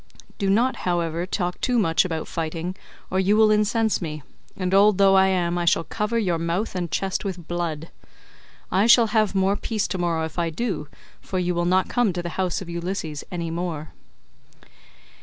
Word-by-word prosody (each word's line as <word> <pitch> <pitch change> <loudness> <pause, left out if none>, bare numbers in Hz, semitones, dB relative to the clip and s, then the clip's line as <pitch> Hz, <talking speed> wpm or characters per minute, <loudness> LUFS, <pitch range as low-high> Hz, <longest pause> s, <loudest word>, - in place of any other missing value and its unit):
Do 200 -2 0
not, 235 +6 +2
however, 170 -1 -1
talk 180 -2 -3
too 250 -1 +1
much 165 -7 +3
about 160 -3 -3
fighting 165 +3 -4 0.4
or 185 - +1
you 200 +3 +3
will 220 -1 +5
incense 215 +1 +2
me, 155 -4 -5 0.3
and 185 -1 -2
old 200 0 +5
though 195 -1 +5
I 190 0 +5
am, 175 -2 0
I 175 - -1
shall 165 - +3
cover 210 +7 -2
your 180 -7 0
mouth 170 +6 -2
and 180 -2 -3
chest 190 +2 -2
with 180 -4 -5
blood. 170 -2 -3 0.8
I 195 +4 +3
shall 235 0 +7
have 215 -3 +2
more 195 +1 +2
peace 215 0 -2
tomorrow 170 -3 -1
if 160 +2 -6
I 170 -1 +1
do, 165 -3 -3 0.3
for 190 - -4
you 180 -1 0
will 175 0 0
not 185 +2 +2
come 240 -6 +1
to 175 0 -4
the 175 - -3
house 185 +1 -2
of - - -13
Ulysses 170 -3 -4
any 170 -2 -3
more." 165 -3 -4
180 Hz, 190 wpm, -24 LUFS, 170-200 Hz, 0.8 s, shall